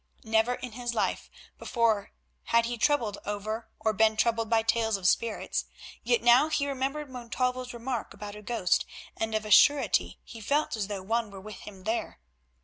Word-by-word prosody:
Never 225 Hz, +2 st, +2 dB
in 250 Hz, -1 st, -7 dB
his 240 Hz, +1 st, -4 dB
life -, -, -1 dB, 0.3 s
before 225 Hz, -4 st, +1 dB, 0.3 s
had 230 Hz, 0 st, +3 dB
he 240 Hz, +1 st, -2 dB
troubled 235 Hz, -9 st, +1 dB
over 215 Hz, +2 st, -4 dB
or 220 Hz, -, +1 dB
been 220 Hz, +1 st, +3 dB
troubled 230 Hz, 0 st, +1 dB
by 225 Hz, -1 st, +3 dB
tales 225 Hz, -1 st, +1 dB
of 185 Hz, -2 st, -1 dB
spirits, 230 Hz, +3 st, 0 dB, 0.4 s
yet 240 Hz, 0 st, +1 dB
now 240 Hz, +5 st, +6 dB
he 295 Hz, -2 st, +1 dB
remembered 280 Hz, +2 st, -2 dB
Montalvo's 250 Hz, 0 st, -3 dB
remark 240 Hz, 0 st, -4 dB
about 205 Hz, 0 st, -8 dB
a 210 Hz, -, -9 dB
ghost, 210 Hz, -5 st, 0 dB, 0.3 s
and 220 Hz, 0 st, -2 dB
of 215 Hz, 0 st, -1 dB
a 215 Hz, -, -5 dB
surety 285 Hz, +7 st, +5 dB
he 225 Hz, -, -11 dB
felt 285 Hz, +7 st, 0 dB
as 210 Hz, -3 st, -2 dB
though 200 Hz, -2 st, -5 dB
one 225 Hz, +2 st, -1 dB
were 195 Hz, -1 st, -10 dB
with 210 Hz, 0 st, -9 dB
him 195 Hz, -3 st, -11 dB
there. 220 Hz, -, -2 dB
225 Hz, 180 wpm, -28 LUFS, 215-245 Hz, 0.4 s, now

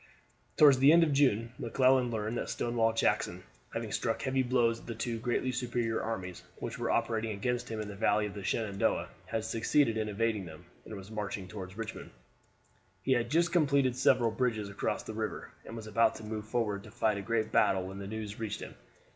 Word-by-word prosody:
Toward 145 Hz, -3 st, +8 dB
the 135 Hz, +3 st, +7 dB
end 170 Hz, +1 st, +7 dB
of 155 Hz, -3 st, +1 dB
June 120 Hz, -5 st, +2 dB
McClellan 130 Hz, +1 st, +3 dB
learned 110 Hz, 0 st, -2 dB
that -, -, -4 dB
Stonewall 115 Hz, -1 st, +1 dB
Jackson, 115 Hz, -, 0 dB, 0.3 s
having -, -, -4 dB
struck 115 Hz, -, -1 dB
heavy 130 Hz, 0 st, +1 dB
blows 120 Hz, -2 st, +2 dB
at -, -, -16 dB
the 115 Hz, -, -4 dB
two 115 Hz, 0 st, -3 dB
greatly 125 Hz, +2 st, 0 dB
superior 120 Hz, -2 st, -1 dB
armies 95 Hz, -5 st, -4 dB, 0.2 s
which -, -, -5 dB
were -, -, -1 dB
operating 110 Hz, -1 st, 0 dB
against 125 Hz, +4 st, -2 dB
him 110 Hz, -1 st, -4 dB
in 105 Hz, -, -4 dB
the 100 Hz, -, -6 dB
valley 105 Hz, +1 st, +2 dB
of 105 Hz, -, -5 dB
the 100 Hz, -1 st, -7 dB
Shenandoah, 100 Hz, 0 st, 0 dB, 0.2 s
had 110 Hz, +1 st, -2 dB
succeeded 115 Hz, +2 st, +2 dB
in 110 Hz, -1 st, -1 dB
evading 105 Hz, -1 st, 0 dB
them, 80 Hz, -1 st, -11 dB, 0.2 s
and 110 Hz, -, -7 dB
was 100 Hz, +1 st, -10 dB
marching 100 Hz, -3 st, -4 dB
toward 95 Hz, -1 st, -8 dB
Richmond. 115 Hz, 0 st, -6 dB, 0.9 s
He 130 Hz, -, 0 dB
had 120 Hz, -2 st, +2 dB
just 170 Hz, +3 st, +2 dB
completed 140 Hz, -7 st, +3 dB
several 120 Hz, -2 st, +3 dB
bridges 110 Hz, -4 st, -1 dB
across 100 Hz, -, -2 dB
the 110 Hz, -, -7 dB
river, 110 Hz, -1 st, -4 dB, 0.2 s
and 115 Hz, -, -7 dB
was 110 Hz, -2 st, -7 dB
about 110 Hz, +2 st, +2 dB
to 110 Hz, -, -9 dB
move 110 Hz, 0 st, -5 dB
forward 105 Hz, -3 st, -1 dB
to -, -, -11 dB
fight 110 Hz, -2 st, 0 dB
a -, -, -4 dB
great 110 Hz, 0 st, -1 dB
battle 95 Hz, -1 st, +3 dB
when 95 Hz, +1 st, -7 dB
the 100 Hz, -, -6 dB
news 110 Hz, 0 st, -5 dB
reached 110 Hz, -3 st, -3 dB
him. -, -, -7 dB
115 Hz, 205 wpm, -31 LUFS, 105-125 Hz, 0.9 s, Toward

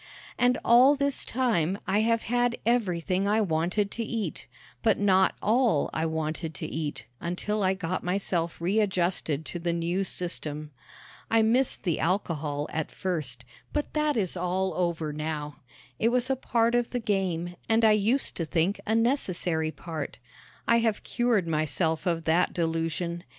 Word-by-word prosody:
And 245 Hz, 0 st, +3 dB
all 250 Hz, +5 st, +7 dB
this 280 Hz, 0 st, 0 dB
time 210 Hz, -8 st, 0 dB
I 200 Hz, +2 st, +2 dB
have 230 Hz, +1 st, +2 dB
had 245 Hz, 0 st, +1 dB
everything 190 Hz, -5 st, +1 dB
I 210 Hz, +2 st, +3 dB
wanted 185 Hz, +2 st, 0 dB
to 235 Hz, -, -3 dB
eat, 225 Hz, -1 st, -4 dB, 0.3 s
but 225 Hz, -, +3 dB
not 190 Hz, -2 st, +3 dB
all 225 Hz, -, +2 dB
I 160 Hz, +1 st, 0 dB
wanted 160 Hz, 0 st, -3 dB
to -, -, -5 dB
eat 155 Hz, -2 st, -4 dB
until 195 Hz, +5 st, -2 dB
I 190 Hz, 0 st, +2 dB
got 185 Hz, -1 st, -3 dB
myself 175 Hz, -2 st, -1 dB
readjusted 180 Hz, -5 st, 0 dB
to 175 Hz, -, -5 dB
the 170 Hz, 0 st, -1 dB
new 170 Hz, +3 st, 0 dB
system. 155 Hz, -5 st, -4 dB, 0.6 s
I 225 Hz, 0 st, +4 dB
missed 245 Hz, +4 st, +1 dB
the 175 Hz, -6 st, 0 dB
alcohol 155 Hz, -5 st, -1 dB
at 160 Hz, -1 st, -2 dB
first, 140 Hz, -10 st, -4 dB, 0.3 s
but 295 Hz, -, -2 dB
that 300 Hz, -3 st, +1 dB
is 190 Hz, -5 st, 0 dB
all 185 Hz, +2 st, -1 dB
over 165 Hz, -4 st, -1 dB
now. 150 Hz, -1 st, -4 dB, 0.4 s
It 230 Hz, -, +3 dB
was 250 Hz, +2 st, +2 dB
a -, -, +2 dB
part 235 Hz, -2 st, +1 dB
of 240 Hz, -1 st, +1 dB
the 245 Hz, -, -2 dB
game 185 Hz, -6 st, -1 dB
and 225 Hz, 0 st, +4 dB
I 220 Hz, -, +7 dB
used 215 Hz, +6 st, +2 dB
to 165 Hz, -, -1 dB
think 170 Hz, +5 st, 0 dB
a 220 Hz, -, +2 dB
necessary 185 Hz, -, +1 dB
part. 160 Hz, -2 st, -6 dB, 0.5 s
I 235 Hz, -, +5 dB
have 225 Hz, -2 st, 0 dB
cured 235 Hz, -7 st, +1 dB
myself 160 Hz, +1 st, 0 dB
of 165 Hz, -2 st, 0 dB
that 165 Hz, +3 st, +2 dB
delusion. 165 Hz, 0 st, -1 dB
185 Hz, 160 wpm, -27 LUFS, 165-225 Hz, 0.6 s, all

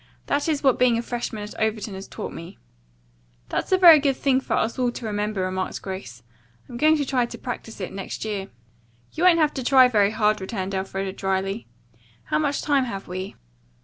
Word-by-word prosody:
That 285 Hz, +3 st, 0 dB
is 300 Hz, -2 st, -1 dB
what 265 Hz, -3 st, +3 dB
being 245 Hz, -2 st, +4 dB
a -, -, 0 dB
freshman 235 Hz, -3 st, -4 dB
at 210 Hz, -, -8 dB
Overton 220 Hz, -1 st, -1 dB
has 190 Hz, +1 st, -8 dB
taught -, -, -7 dB
me." 170 Hz, +4 st, -9 dB, 0.9 s
"That's -, -, -2 dB
a 375 Hz, -, +5 dB
very 340 Hz, -4 st, +9 dB
good 275 Hz, -2 st, +1 dB
thing 265 Hz, -1 st, +2 dB
for -, -, -1 dB
all -, -, +2 dB
of 225 Hz, -, -6 dB
us 245 Hz, -1 st, +1 dB
to 235 Hz, -, -7 dB
remember," 210 Hz, -1 st, -2 dB
remarked 185 Hz, 0 st, -2 dB
Grace. 125 Hz, -, -7 dB, 0.4 s
"I'm 240 Hz, -, -10 dB
going 310 Hz, +3 st, +4 dB
to 290 Hz, -, -1 dB
try 250 Hz, -2 st, +1 dB
to -, -, -9 dB
practise 235 Hz, -3 st, -7 dB
it 185 Hz, -, -5 dB
next 195 Hz, +2 st, -5 dB
year." 200 Hz, -3 st, -3 dB, 0.6 s
"You 335 Hz, -, -1 dB
won't 355 Hz, -2 st, +7 dB
have 305 Hz, -2 st, +2 dB
to 265 Hz, -, -4 dB
try 260 Hz, 0 st, +6 dB
very 205 Hz, -5 st, +3 dB
hard," 215 Hz, -1 st, +1 dB
returned 190 Hz, -1 st, -4 dB
Elfreda 195 Hz, 0 st, -3 dB
dryly. 195 Hz, +2 st, -2 dB, 0.6 s
"How -, -, 0 dB
much 285 Hz, -2 st, -1 dB
time 280 Hz, -3 st, +2 dB
have 195 Hz, -5 st, -6 dB
we?" 185 Hz, +2 st, -6 dB
220 Hz, 210 wpm, -24 LUFS, 195-265 Hz, 0.9 s, very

